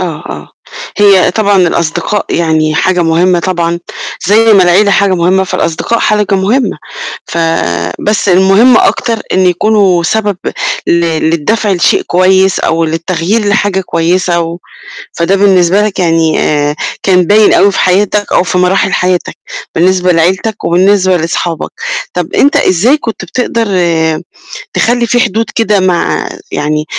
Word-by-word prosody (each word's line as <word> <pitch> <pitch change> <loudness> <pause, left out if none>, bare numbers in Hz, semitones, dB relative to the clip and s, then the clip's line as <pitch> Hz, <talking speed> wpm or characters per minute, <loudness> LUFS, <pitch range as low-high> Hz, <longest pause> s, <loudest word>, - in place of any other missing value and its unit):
آه، - - -1 0.3
آه، 75 -1 -8 0.5
هي 200 -3 +4
طبعًا 205 +1 +1
الأصدقاء 170 +5 -2
يعني 155 -2 0
حاجة 180 +2 +1
مُهمة 170 +2 +1
طبعًا، 170 -1 -2 0.5
زي 220 +3 +4
ما 195 -3 +5
العيلة 185 +4 +3
حاجة 200 -1 +2
مُهمة، 185 +2 +1
فالأصدقاء 185 +5 -2
حاجة 210 -2 +1
مُهمة، 210 +8 0 0.5
ف - - -5 0.6
بس 210 -1 -1
المُهم 195 +7 +4
أكتر 230 -2 0
إن 185 - +1
يكونوا 185 -1 +2
سبب 205 +2 -1 0.5
ل - - +1
للدفع 170 +6 -1
لشيء 175 - +1
كويس، 190 +1 +2
أو 165 +1 0
للتغيير 170 +6 -2
لحاجة 205 -2 0
كويسة، 175 0 -1
و 170 +1 -4 0.5
فده 170 +4 0
بالنسبة 190 -1 +3
لك 210 -2 -3
يعني 165 -3 +1
آآ، 145 0 0 0.3
كان 185 -2 +3
باين 210 +3 +4
أوي 200 - +3
في - - -3
حياتك، 205 +2 0
أو - - +3
في 180 0 -2
مراحل 185 +1 +1
حياتك، 180 -1 -1 0.4
بالنسبة 180 +1 +2
لعيلتك 185 +6 -1
وبالنسبة 185 +1 +2
لصحابك، 165 0 -3 0.4
طب - - -4
أنت 285 - +2
إزاي 205 - +2
كنت 225 -9 -6
بتقدر 230 +4 -2 1.1
تخلّي 240 0 0
في 245 +2 +1
حدود 225 -2 0
كده 210 -3 +1
مع 185 -2 -1 0.2
يعني 150 +1 -2
185 Hz, 140 wpm, -10 LUFS, 170-205 Hz, 1.1 s, ما